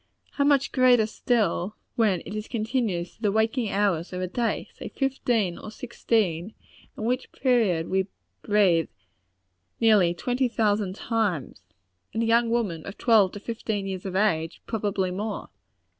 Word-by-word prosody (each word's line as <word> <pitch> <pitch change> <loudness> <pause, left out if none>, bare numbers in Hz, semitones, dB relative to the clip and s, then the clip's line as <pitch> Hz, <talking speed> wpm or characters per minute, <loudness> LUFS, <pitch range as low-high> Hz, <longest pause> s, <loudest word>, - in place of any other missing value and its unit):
How 280 - 0
much 280 -1 +3
greater 250 -4 +5
still, 215 -4 0 0.2
when 205 -7 +2
it - - -7
is 215 0 -4
continued 220 -6 -1
through 220 - -25
the 210 -3 +2
waking 220 +2 +1
hours 195 -5 0
of 180 - -4
a 185 - -1
day, 230 +6 -2
say - - -8
fifteen 240 -9 0
or - - -8
sixteen 215 -5 -1 0.4
in - - -5
which 245 +3 -1
period 220 -11 +1
we 190 0 0 0.3
breathe 195 -6 +3 0.9
nearly 205 -6 +4
twenty 250 +6 0
thousand 210 -4 0
times 205 - -2 0.5
and 225 - +1
a - - +1
young 230 +1 +3
woman 205 -9 -1
of 200 - -8
twelve 215 -6 +4
to 205 - -6
fifteen 215 -2 -3
years 190 -1 -4
of 185 - -5
age, 170 -5 0
probably 200 -4 -1
more! 205 +3 -4
215 Hz, 155 wpm, -26 LUFS, 185-230 Hz, 0.9 s, greater